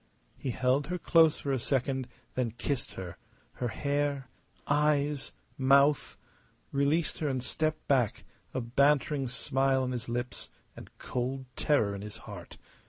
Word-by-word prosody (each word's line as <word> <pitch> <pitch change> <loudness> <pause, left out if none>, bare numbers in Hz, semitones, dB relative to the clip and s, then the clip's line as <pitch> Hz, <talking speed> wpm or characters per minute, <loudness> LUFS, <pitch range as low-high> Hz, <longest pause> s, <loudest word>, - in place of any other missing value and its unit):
He 135 - -4
held 130 +3 +1
her 180 - -2
close 165 -3 +5
for 140 - -3
a 135 - +1
second, 130 0 0 0.3
then 120 -4 -1
kissed 140 0 -2
her 90 -2 -6 0.4
her 125 - -2
hair, 140 +2 -1 0.4
eyes, 145 -1 +1 0.3
mouth 140 +2 +4 0.5
released 145 +4 +1
her 155 - 0
and 130 -3 -1
stepped 155 +3 -2
back, 125 -6 +2 0.3
a 130 - -2
bantering 140 +3 +2
smile 130 +2 +1
on 130 - -1
his 120 -2 -4
lips 120 +1 -3 0.3
and - - -10
cold 130 +2 -3
terror 110 -9 +2
in 100 - -5
his 105 +1 -6
heart. 100 -5 -9
135 Hz, 145 wpm, -30 LUFS, 125-145 Hz, 0.5 s, close